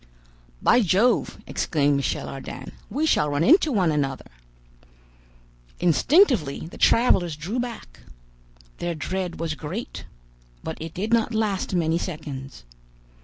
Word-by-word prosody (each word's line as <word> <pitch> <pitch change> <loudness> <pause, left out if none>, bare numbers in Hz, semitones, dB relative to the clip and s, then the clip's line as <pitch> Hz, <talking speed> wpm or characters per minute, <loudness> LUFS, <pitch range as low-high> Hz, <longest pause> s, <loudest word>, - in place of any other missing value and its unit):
"By 245 - +5
Jove!" 205 +5 +2
exclaimed 145 -3 +1
Michel 140 - -2
Ardan, 135 - -8 0.2
"we 290 +9 -1
shall 150 - +2
run 145 +2 0
into 320 - +5
one 185 -8 +2
another!" 135 - -2 1.5
Instinctively 180 - +3
the 165 - -11
travelers 180 -9 +3
drew 180 +11 -4
back. 235 - -6 0.8
Their 175 -1 -2
dread 180 +3 -4
was 165 -2 -2
great, 165 +10 -6 0.6
but 160 - -6
it 160 0 -7
did 210 +5 -2
not 230 0 +2
last 205 -4 -1
many 165 -1 +1
seconds. 140 - -7
175 Hz, 120 wpm, -24 LUFS, 150-225 Hz, 1.5 s, By